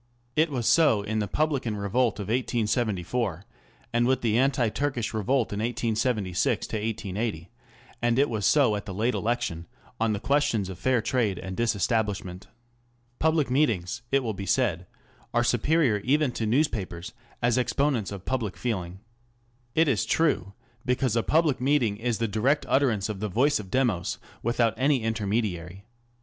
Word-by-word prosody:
It 155 +2 +3
was 125 -5 -3
so 145 -10 +4
with 110 +2 -2
the 105 - -1
publican 135 -5 -1
revolt 110 +3 0
in - - -2
1874, 110 -4 -1 0.5
and 120 0 +2
with 130 0 +2
the 110 -2 +1
anti 125 -2 +2
Turkish 125 -1 -2
revolt 115 +2 0
in 100 - -3
1876 115 -4 -1
80, 105 -4 -3 0.5
and 120 0 +2
it 140 +2 +4
was 110 -5 -3
so 135 -8 +4
at 105 - -6
the 95 - -5
late 115 +5 +1
election 105 -8 -2 0.3
on 115 0 +2
the 100 - -2
ques 145 +6 +2
tions 100 -4 -1
of 95 - -8
Fair 130 -4 +1
Trade 115 -5 0
and 95 0 -6
Disestablishment. 105 -4 -1 0.7
Public 155 -4 +2
meetings, 120 - +1
it 135 -1 +3
will 110 -2 -2
be 100 0 -6
said, 90 -9 +1 0.5
are 120 - +4
superior 120 +1 +2
even 140 +5 +1
to 115 -2 -3
newspapers 110 - -1 0.3
as 120 +1 +3
exponents 125 -5 0
of 100 -2 -8
public 115 -7 -2
feeling. 95 -6 -3 0.7
It 160 0 +4
is 120 -9 +1
true, 100 - +1 0.3
because 125 -2 0
a 115 - +3
public 155 -1 +2
meeting 125 -6 +2
is 115 0 -1
the 115 - 0
direct 125 +8 +1
utterance 120 -8 +2
of 105 -3 -5
the 105 +1 -2
voice 135 +8 +2
of 100 -3 -8
Demos 90 - 0 0.2
without 120 -1 +1
any 135 -2 +2
intermediary. 100 -4 -2
115 Hz, 160 wpm, -26 LUFS, 100-130 Hz, 0.7 s, so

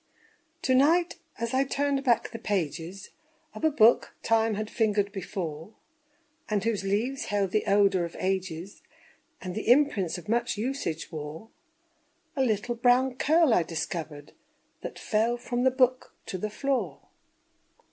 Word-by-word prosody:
To 260 - +2
night, 330 +7 +3 0.2
as 235 +1 -3
I 265 +1 +3
turned 280 0 -1
back 235 -4 +2
the 230 - -7
pages 180 -2 -3 0.4
Of - - -10
a 315 - +5
book 235 -6 +4
Time 225 -1 +2
had 215 +1 -3
fingered 210 -3 +1
before, 185 -1 -6 0.7
And 210 -2 0
whose 220 -3 -1
leaves 220 +8 -1
held 200 -2 0
the 215 - 0
odor 195 -2 +4
of 170 - -6
ages, 185 -1 -3 0.6
And 185 -1 -4
the 215 +3 -3
imprints 240 - +3
of 175 - -11
much 235 0 0
usage 215 - -3
wore, 155 +6 -7 0.9
A 270 - 0
little 240 -1 0
brown 245 +2 +3
curl 315 -2 +4
I 180 - +4
discovered, 155 -2 -5 0.5
That - - -7
fell 230 +3 0
from 245 +1 -2
the - - +7
book 255 0 +1
to 185 - -5
the 215 - -2
floor. 230 - -2
215 Hz, 145 wpm, -27 LUFS, 185-250 Hz, 0.9 s, the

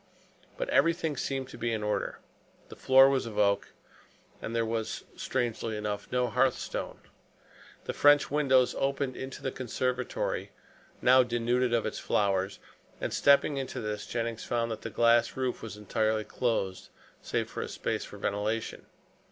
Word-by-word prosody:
But - - -2
everything 165 -2 +2
seemed 135 0 -3
to - - -11
be 120 0 -1
in 110 -2 -2
order. 105 0 -1 0.5
The - - -10
floor 135 +1 +6
was 135 -3 +1
of 105 -2 -7
oak, 100 -1 +2 0.7
and 115 - -4
there 115 -1 +1
was 110 -1 -3
strangely 115 -3 -2
enough 105 -1 -4
no 125 0 +1
hearth 125 +1 +2
stone. - - -5 0.8
The - - -3
French 145 -1 +5
windows 135 -4 +3
opened 140 -1 -1
into 130 0 -7
the 135 - -1
conservatory, 125 0 -2 0.5
now 130 +1 +7
denuded 120 +1 +1
of 115 -1 +1
its 110 - -3
flowers, 100 -1 0 0.4
and - - -3
stepping 140 0 +4
into 135 -1 -4
this 105 -2 -4
Jennings 115 -1 -3
found 115 -1 -1
that 110 - -5
the - - -5
glass 115 0 +3
roof 130 -2 -2
was 110 -2 -7
entirely 110 +1 0
closed, 105 -6 -2 0.3
save - - -2
for - - -5
a - - -4
space - - -2
for - - -10
ventilation. 105 +2 -2
120 Hz, 160 wpm, -29 LUFS, 110-130 Hz, 0.8 s, now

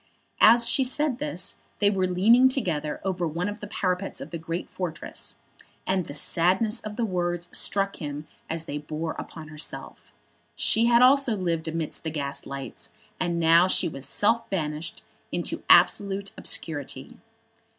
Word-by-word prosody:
As 235 +1 +7
she 265 - +3
said 260 0 0
this 200 - -2 0.2
they 205 -1 +3
were 190 -2 +1
leaning 225 +8 +5
together 165 - -1
over 180 -3 -1
one 170 +4 -2
of 205 +1 -5
the 210 - -7
parapets 190 -2 -2
of - - -8
the 170 - -5
great 165 +2 -4
fortress, 175 -4 -5 0.5
and 185 -3 0
the 145 - -7
sadness 190 - +2
of 215 -1 -7
the 235 - 0
words 175 -3 -2
struck 195 0 0
him 150 -1 -6 0.2
as 165 0 -3
they 150 -2 -4
bore 155 +2 -4
upon 155 -2 -9
herself. 155 0 -5 0.4
She 230 +2 +3
also 255 +1 +5
had 200 - -4
lived 165 -2 -1
amidst 160 -1 -4
the 160 - -2
gaslights, 140 -3 -6 0.3
and 170 -1 -1
now 165 +2 +5
she - - +2
was 135 -4 -5
self 230 +3 +1
banished 155 -3 -3 0.3
into - - -2
absolute 200 0 +4
obscurity. 145 -4 -3
180 Hz, 155 wpm, -26 LUFS, 160-210 Hz, 0.5 s, As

